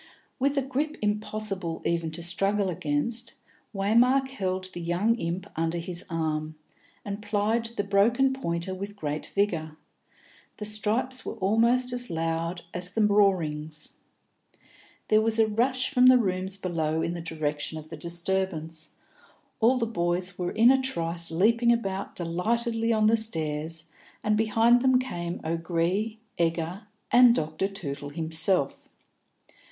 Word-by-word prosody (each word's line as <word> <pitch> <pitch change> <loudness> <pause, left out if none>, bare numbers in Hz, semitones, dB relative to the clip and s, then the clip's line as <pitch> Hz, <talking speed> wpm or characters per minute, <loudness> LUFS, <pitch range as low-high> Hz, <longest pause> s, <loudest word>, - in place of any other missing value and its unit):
With 280 +2 +1
a 275 - +2
grip 285 +4 -2
impossible 210 -4 -2
even 170 -1 0
to 170 - -5
struggle 195 +3 +1
against, 165 +10 -1 0.4
Waymark 245 +7 +3
held 185 -7 -3
the 175 - -6
young 175 +7 +1
imp 175 0 -3
under 165 +1 -1
his 170 +1 -4
arm, 155 -2 -2 0.5
and 200 0 -5
plied 210 +2 0
the 205 - +1
broken 230 +7 +3
pointer 170 -7 -3
with 200 +2 -6
great 150 -5 -4
vigour; 165 -6 -1 0.8
the 210 - -5
stripes 220 +5 0
were - - -5
almost 230 +5 +2
as 245 -2 -2
loud 165 +1 -2
as 180 0 -2
the 215 +2 +1
roarings. 160 -7 +1 1.1
There 215 0 +5
was 225 0 +1
a 225 - +5
rush 255 +5 0
from 255 -2 +5
the 255 0 +8
rooms 190 -3 0
below 160 -4 -1
in 170 - -1
the 175 - -5
direction 155 -1 -3
of 155 0 -10
the - - -7
disturbance; 170 -2 -3 0.6
all 240 +3 +4
the 235 - 0
boys 180 -3 -1
were 180 -1 -2
in 235 +3 +6
a 265 0 +3
trice 170 -9 -2
leaping 230 +8 +3
about 195 -4 -2
delightedly 225 +7 -1
on 215 -1 +3
the 225 +1 +5
stairs, 160 -5 -2 0.3
and 215 0 +2
behind 225 +3 +4
them 260 0 +4
came 175 -10 -4
O'Gree, 170 +6 -1 0.2
Egger, 170 +4 -1 0.2
and 245 -1 +7
Dr. 155 +3 -1
Tootle 145 -7 -6
himself. 160 0 +1
190 Hz, 140 wpm, -27 LUFS, 165-225 Hz, 1.1 s, the